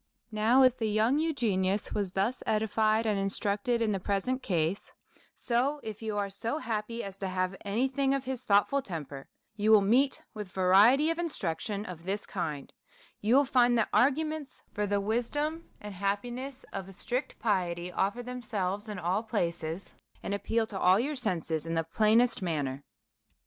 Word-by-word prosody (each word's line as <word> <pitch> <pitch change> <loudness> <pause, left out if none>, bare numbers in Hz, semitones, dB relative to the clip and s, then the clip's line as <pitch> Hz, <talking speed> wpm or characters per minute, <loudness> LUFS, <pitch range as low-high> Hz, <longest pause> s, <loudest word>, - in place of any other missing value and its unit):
Now, 225 +5 +4
as 255 -1 +6
the 225 -3 -2
young 220 +7 +2
Eugenius 210 - 0
was 200 -3 -1
thus 210 +7 0
edified 220 0 +2
and 210 -2 +1
instructed 205 +4 0
in 220 - +1
the 195 - -1
present 200 +8 -1
case, 175 -2 -1 0.4
so, 260 +5 0
if 215 -1 -6
you 215 -2 -3
are 200 -1 0
so 230 +8 -3
happy 230 -3 -3
as 195 -1 -7
to 195 - -3
have 185 0 -1
any 220 +6 +1
thing 270 +1 +1
of 275 -1 -3
his 260 -1 -3
thoughtful 210 +5 +3
temper, 145 - -7 0.3
you 215 0 0
will 215 -2 +8
meet 255 +7 +3
with 210 -4 -7
variety 205 - +5
of 330 - -3
instruction 210 - -3
of 170 -4 -8
this 195 +3 -2
kind; 155 -7 -4 0.5
you 220 +4 +2
will 280 +1 +5
find 245 -2 +4
that 225 - +1
arguments 300 +1 +1
for 210 0 -1
the 200 0 +1
wisdom 290 +10 -2
and 210 -1 -8
happiness 240 +8 -3
of 190 0 -5
a - - -11
strict 245 +7 -3
piety 180 -5 -1
offer 205 +7 -1
themselves 215 -5 -3
in 210 - -5
all 180 +4 0
places, 170 -5 -3 0.3
and - - -2
ap 200 - -4
peal 225 0 +1
to 200 -3 -6
all 185 +2 +5
your 290 +5 -1
senses 165 - -2
in 165 - -2
the 165 - +1
plainest 215 +9 +3
manner. 145 -6 -2
210 Hz, 175 wpm, -29 LUFS, 190-245 Hz, 0.5 s, will